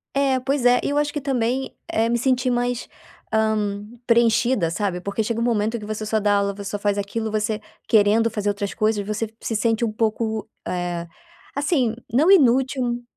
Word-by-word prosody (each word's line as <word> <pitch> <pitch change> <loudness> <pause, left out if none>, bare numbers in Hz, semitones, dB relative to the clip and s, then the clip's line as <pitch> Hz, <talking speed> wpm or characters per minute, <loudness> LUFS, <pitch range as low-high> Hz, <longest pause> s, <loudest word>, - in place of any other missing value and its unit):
É, 275 -2 +2
pois 270 +1 -1
é, 245 0 +6
e - - -1
eu 290 - 0
acho 295 0 0
que 295 - -3
também 260 -1 -1 0.2
é 225 +1 +2
me 235 +1 +1
sentir 255 0 +1
mais, 245 0 -1 0.5
hã, 215 -2 +1 0.2
preenchida, 235 -4 +3
sabe, 180 +1 -2
porque 200 +4 -2
chega 230 +1 -2
um - - +1
momento 225 -1 +1
em - - -3
que 210 - -8
você 215 0 -4
só 220 +1 +1
dá 205 0 +2
aula. 200 0 +1
Você 200 0 -8
só 205 - -3
faz 205 0 0
aquilo, 220 +2 -3
você 215 0 -1 0.3
querendo 220 +1 +4
fazer 210 -2 -2
outras 200 -1 -2
coisas, 215 -2 +1
você 215 +2 -2
se 225 - -2
sente 225 +1 +1
um 225 - +1
pouco, 220 0 -1 0.2
eh, 175 -1 -3 0.5
assim, 280 -5 +1 0.2
não 290 +9 +3
inútil 255 -6 +3
225 Hz, 195 wpm, -22 LUFS, 210-245 Hz, 0.5 s, é